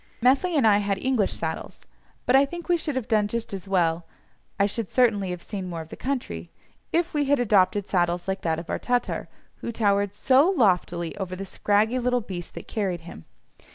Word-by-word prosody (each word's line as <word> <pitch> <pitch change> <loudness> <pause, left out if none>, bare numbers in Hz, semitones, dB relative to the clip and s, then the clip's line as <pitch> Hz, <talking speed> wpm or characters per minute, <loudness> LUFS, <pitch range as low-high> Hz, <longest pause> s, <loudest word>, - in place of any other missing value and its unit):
Methley 275 +8 +3
and 270 - +3
I 205 -2 +5
had 200 -1 0
English 245 -2 +1
saddles, - - -5 0.4
but 250 - +4
I 270 - +7
think 345 +5 -6
we 350 - +4
should 310 -4 -2
have 260 -4 -2
done 215 -2 +2
just 230 0 -4
as 195 -1 -6
well 170 -3 +1 0.5
(I 200 - +5
should 210 0 -3
certainly 220 -7 +2
have 180 -1 -5
seen 190 -3 -5
more 170 -2 -4
of 160 - -11
the - - -8
country) 240 - -4 0.4
if 340 +1 +1
we 295 -1 +1
had 280 0 +3
adopted 205 -3 +3
saddles 175 -1 0
like 190 0 -2
that 160 -1 0
of 165 - -7
our - - -1
Tatar, 245 -1 -1 0.3
who - - -5
towered 205 -3 +1
so 270 - +4
loftily 180 - +1
over 185 -2 -4
the 195 +1 -6
scraggy 210 +5 +1
little 250 0 +1
beast 180 -5 -7
that - - -8
carried 190 -6 -2
him. 165 - -11
205 Hz, 205 wpm, -25 LUFS, 185-250 Hz, 0.5 s, I